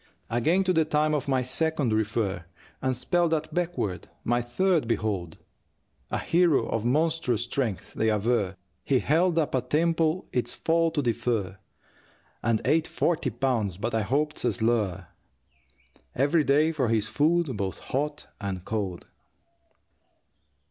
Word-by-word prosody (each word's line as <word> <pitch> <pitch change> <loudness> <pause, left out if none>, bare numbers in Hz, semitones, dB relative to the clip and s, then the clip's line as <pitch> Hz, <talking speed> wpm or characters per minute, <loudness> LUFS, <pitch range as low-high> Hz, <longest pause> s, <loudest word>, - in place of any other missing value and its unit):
Again 160 +12 +2
to 185 -1 +1
the 160 -2 +4
time 155 0 +1
of 145 -3 -1
my 130 -2 +1
second 145 -2 0
refer, 105 -4 -1 0.4
And 130 -1 0
spell 175 +7 +1
that 160 -1 -2
backward, 175 - -2
my 120 +1 +1
third 165 +4 +1
behold 100 -8 -2 0.7
A - - -1
hero 170 -4 +2
of 115 - -2
monstrous 145 -3 +1
strength. 120 -6 -3
They 110 - +1
aver 105 -2 +1 0.3
He 135 - +2
held 165 +6 +2
up 160 -3 +1
a 130 - +2
temple 165 +3 +1
its 125 - 0
fall 165 0 +2
to 145 -3 -1
defer, 115 -5 -1 0.8
And 115 -2 +1
ate 160 +1 +2
forty 160 -5 0
pounds 115 -6 -1
(but 115 +4 -3
I 110 - +2
hope 145 +8 0
'tis - - -2
a - - +2
slur) 110 -5 0 1.1
Every 145 +5 +3
day 150 +3 +3
for 140 -6 0
his 110 -2 +1
food, 150 +4 +1
both 100 -2 -3
hot 150 +2 -3 0.2
and 95 -3 -4
cold. 100 -5 -3
130 Hz, 145 wpm, -27 LUFS, 110-160 Hz, 1.1 s, the